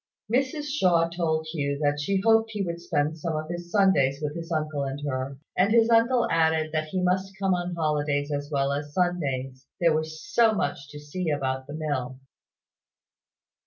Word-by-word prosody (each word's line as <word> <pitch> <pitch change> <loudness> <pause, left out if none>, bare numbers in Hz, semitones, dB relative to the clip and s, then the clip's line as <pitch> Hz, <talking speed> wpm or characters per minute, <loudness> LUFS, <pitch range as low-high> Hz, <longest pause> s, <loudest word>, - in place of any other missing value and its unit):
Mrs 270 +4 +1
Shaw 180 - +2
told 160 -2 -1
Hugh 140 -3 -1
that 145 0 0
she 195 +6 0
hoped 225 0 +4
he 205 -2 -1
would 170 -2 -4
spend 155 -2 -1
some 160 0 -2
of 155 +1 -4
his 175 0 -6
Sundays 170 -10 +3
with 150 0 -3
his 165 0 -6
uncle 155 -2 -1
and 135 +1 -4
her; 130 0 -3 0.2
and 195 +3 +3
his 230 0 +4
uncle 235 +2 +4
added 160 -1 +2
that 155 0 -1
he 185 +4 -2
must 190 +2 0
come 195 -1 +1
on 175 0 -2
holidays 150 -2 0
as 145 0 -3
well 140 -1 +1
as 145 +1 -5
Sundays, 135 -8 -1
there 170 -2 +4
was 155 0 -2
so 235 - +3
much 145 -7 -2
to 150 0 -9
see 160 +4 -4
about 130 -2 -2
the 145 - -7
mill. 140 -5 -3
160 Hz, 185 wpm, -26 LUFS, 145-185 Hz, 0.2 s, hoped